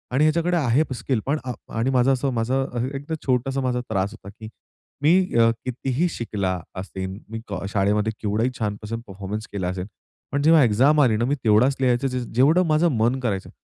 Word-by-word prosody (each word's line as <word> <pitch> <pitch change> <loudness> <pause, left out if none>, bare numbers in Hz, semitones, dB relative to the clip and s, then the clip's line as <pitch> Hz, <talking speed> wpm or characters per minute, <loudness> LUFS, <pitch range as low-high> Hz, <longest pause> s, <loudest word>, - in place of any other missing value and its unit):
आणि 145 - +4
ह्याच्याकडे 170 +3 +2
आहेत 135 0 +1
स्किल 125 0 -1
पण." 145 +3 0
आ 125 - -2 0.3
आणि 120 +4 +1
माझं 130 0 +3
असं 135 +1 -1
माझं 125 +1 -1
एकदम 145 +4 -4
छोटासा 135 +1 +1
माझा 125 -1 0
त्रास 100 -1 0
होता, 100 -3 -12
की 110 +2 -11 0.5
मी 180 +5 +3
अ, 115 0 +6 0.2
कितीही 130 +5 -1
शिकला 100 - -2 0.2
असेल, 95 0 -6
मी 115 0 -5
को 100 -1 -5
शाळेमध्ये 105 +2 +1
केवढही 110 +3 0
छानपासून 105 +1 -3
परफॉर्मन्स 100 +2 -6
केला 95 -3 -2
असेल, 90 +1 -4 0.4
पण 140 - 0
जेव्हा 160 0 +6
एक्झाम 130 +7 +4
आली 120 -6 +4
ना, 120 - +1
मी 140 +3 +1
तेवढाच 115 +5 +4
लिहायचं 125 +1 +2
ज 125 -1 -3
जेवढं 155 +9 +4
माझं 155 +2 +3
मन 120 +4 +1
करायचं. 105 -7 -2
125 Hz, 185 wpm, -23 LUFS, 105-135 Hz, 0.5 s, अ